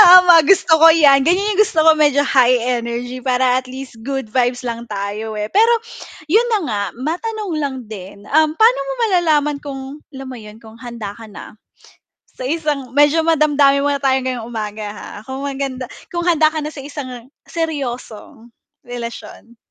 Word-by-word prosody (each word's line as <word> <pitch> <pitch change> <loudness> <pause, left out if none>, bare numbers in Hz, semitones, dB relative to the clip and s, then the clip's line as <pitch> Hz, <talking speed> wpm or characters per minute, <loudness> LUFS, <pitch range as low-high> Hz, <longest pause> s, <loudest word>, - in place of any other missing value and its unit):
Tama 355 -3 +8
gusto 335 -1 +4
ko 325 +1 +7
yan, 280 -4 +5
ganyan 365 +6 +2
yung 425 - +6
gusto 325 - -1
ko 320 0 +5
medyo 290 -2 +3
high 255 -3 +3 0.2
energy 240 +2 -5
para 255 -1 +2
at 255 - -2
least 260 -1 -10
good 270 -3 -4
vibes 245 +1 0
lang 235 -1 -5
tayo, 210 0 -5
eh. 210 0 -4
pero 450 - +3 0.6
'yun 435 +8 +4
na 435 - +3
nga 205 -3 -2
matanong 365 - -4
lang 285 -3 -3
din, 200 -2 -10
um, 310 +1 +3
paano 450 +9 +4
mo - - -4 0.2
malalaman 310 -6 +1
kung 275 -2 -6 0.3
alam 270 -1 -9
mo 255 - -8
'yun, 215 -1 -13
kung 220 -1 -15
handa 230 -4 -8
ka 230 - -12
na 210 0 -12 0.7
sa 255 - -9
isang 290 -4 -3
medyo 295 +3 +3
madamdamin 295 -3 +3
muna 285 0 0
tayong 265 -1 +1
ngayong 240 -3 -5
umaga, 215 -2 -5
ha, - - -10 0.2
kung 265 +2 -6
maganda 270 -2 -4 0.2
kung 345 - -1
handa 320 -3 +3
ka 310 - -3
na 300 - -4
sa 280 -3 -10
isang 255 -5 -8 0.2
seryosong 245 -7 -6 0.3
relasyon? 235 -1 -9
270 Hz, 175 wpm, -18 LUFS, 240-315 Hz, 0.7 s, Tama